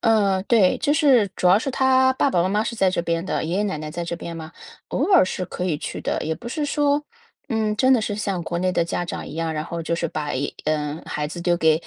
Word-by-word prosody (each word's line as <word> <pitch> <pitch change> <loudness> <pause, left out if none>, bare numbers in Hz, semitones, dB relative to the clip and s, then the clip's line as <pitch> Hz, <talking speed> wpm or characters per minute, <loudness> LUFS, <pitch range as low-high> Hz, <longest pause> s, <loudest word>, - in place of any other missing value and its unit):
呃， 205 -5 +3
对， 205 -5 +3
就 290 -1 +1
是 270 -9 +4
主 - - 0
要 185 +3 +6
是 270 - -3
他 260 0 +3
爸 275 - +2
爸 175 - +2
妈 185 - +1
妈 210 +3 +1
是 235 - -3
在 195 -4 +2
这 175 - -1
边 170 0 -1
的， - - -1
爷 170 +4 -1
爷 - - +2
奶 195 -4 -2
奶 155 0 -6
在 170 +2 -4
这 170 0 -4
边 170 0 -7
嘛， 160 0 -8 0.4
偶 - - 0
尔 370 - +8
是 185 0 -2
可 180 0 -4
以 165 -5 0
去 - - -6
的， - - -1
也 160 - -1
不 235 - -9
是 295 +5 -2
说， 290 0 +1 0.5
嗯， 215 -2 0
真 260 +3 +4
的 250 - +4
是 210 -1 -2
像 200 -4 -2
国 170 +1 -3
内 185 +1 0
的 170 - +2
家 170 +1 -2
长 175 - -5
一 - - -8
样， 165 0 -2
然 155 -1 -2
后 170 0 -4
就 170 - -1
是 170 - -2
把 150 -1 -4
一 135 +3 -1 0.2
呃， 150 0 -1
孩 150 0 -3
子 170 +2 -7
丢 175 0 +2
给 160 -2 +4
185 Hz, 300 characters per minute, -23 LUFS, 165-230 Hz, 0.5 s, 尔